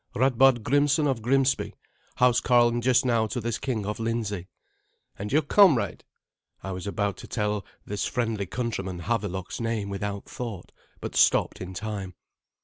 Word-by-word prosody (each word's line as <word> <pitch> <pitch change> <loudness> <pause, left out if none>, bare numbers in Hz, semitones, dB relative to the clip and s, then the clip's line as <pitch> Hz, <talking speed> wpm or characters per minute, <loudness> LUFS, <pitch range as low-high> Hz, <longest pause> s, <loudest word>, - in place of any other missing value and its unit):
"Radbard 130 -1 +4
Grimsson 145 +4 +3
of 135 -5 0
Grimsby, 135 +3 +1 0.4
housecarl 120 -1 +4
just 125 +1 +3
now 115 -3 +2
to 125 - -3
this 120 0 -2
King 115 -6 -2
of 105 +2 -3
Lindsey." 110 -5 -2 0.7
"And 105 +1 -4
your 155 +3 +3
comrade?" 165 - +4 0.6
I 95 - -4
was 95 +1 -5
about 100 -1 -1
to - - -10
tell 105 -2 -1 0.2
this 105 0 -2
friendly 110 -5 -1
countryman 95 -6 -3
Havelok's 100 -1 -3
name 115 -3 -2
without 100 0 -4
thought, 115 -7 -7 0.3
but - - -6
stopped - - +3
in 95 0 -7
time. 100 -2 -5
115 Hz, 145 wpm, -26 LUFS, 100-125 Hz, 0.7 s, Radbard